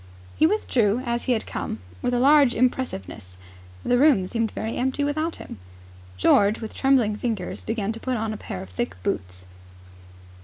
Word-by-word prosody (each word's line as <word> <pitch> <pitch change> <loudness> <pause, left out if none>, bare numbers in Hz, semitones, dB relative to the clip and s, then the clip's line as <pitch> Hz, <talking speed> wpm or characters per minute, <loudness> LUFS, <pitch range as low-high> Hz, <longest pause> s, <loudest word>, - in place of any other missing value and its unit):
He 315 - +4
withdrew 250 - +1
as 235 0 -2
he 255 - +2
had 220 - -2
come, - - -4 0.2
with - - 0
a 245 - +1
large 275 -1 +5
impressiveness. 110 - -2 0.5
The 245 - +3
room 270 -10 +5
seemed 225 +3 -1
very 220 +2 -4
empty 265 +3 -1
without 310 +3 -1
him. - - -10 0.6
George, 200 - +4
with 220 -2 -7
trembling 255 -6 +2
fingers, 215 -6 -3
began 220 -2 -2
to 225 - -7
put 255 +1 -2
on 220 0 -2
a - - -5
pair 95 - -6
of 95 - -13
thick 90 0 -3
boots. 90 0 -3
230 Hz, 175 wpm, -24 LUFS, 200-260 Hz, 0.6 s, large